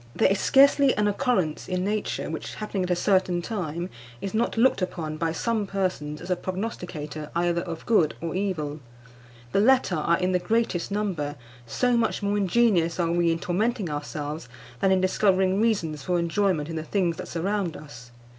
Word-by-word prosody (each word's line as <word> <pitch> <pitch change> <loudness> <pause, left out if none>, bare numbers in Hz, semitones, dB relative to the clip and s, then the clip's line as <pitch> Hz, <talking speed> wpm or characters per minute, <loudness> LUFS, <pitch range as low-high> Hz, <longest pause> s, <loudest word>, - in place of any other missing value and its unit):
There - - +4
is 200 - +1
scarcely 280 0 +5
an 210 0 +2
occurrence 205 - 0
in 180 0 -1
nature 210 +1 -2
which, - - -5
happening 210 -2 -3
at 180 - -2
a 180 - +3
certain 185 -1 +2
time, 175 -5 -4 0.3
is 195 - -5
not 230 +1 0
looked 235 -3 +4
upon 165 -4 -3
by 165 0 0
some 215 +4 -1
persons 180 -7 -2
as 175 +2 -6
a - - +3
prognosticator 175 -6 -5
either 170 0 +1
of 170 -2 -6
good 175 -10 +3
or 165 -1 -4
evil. 170 -6 -2 0.7
The - - +2
latter 240 -5 +4
are 170 +2 +2
in 185 0 0
the 180 - +2
greatest 225 -4 0
number, 185 -8 -2 0.3
so 245 - +1
much 230 -2 0
more 200 0 +1
ingenious 195 -4 +2
are 170 -1 +1
we 170 -1 +2
in 165 - 0
tormenting 195 +2 -1
ourselves 150 0 -5 0.3
than 195 - +3
in 190 -1 +3
discovering 190 0 +2
reasons 170 -10 0
for 180 +5 0
enjoyment 170 -2 +1
in 165 -1 -5
the 155 - -3
things 170 0 0
that - - -6
surround 185 0 -2
us. 125 -5 -12
185 Hz, 185 wpm, -26 LUFS, 165-205 Hz, 0.7 s, scarcely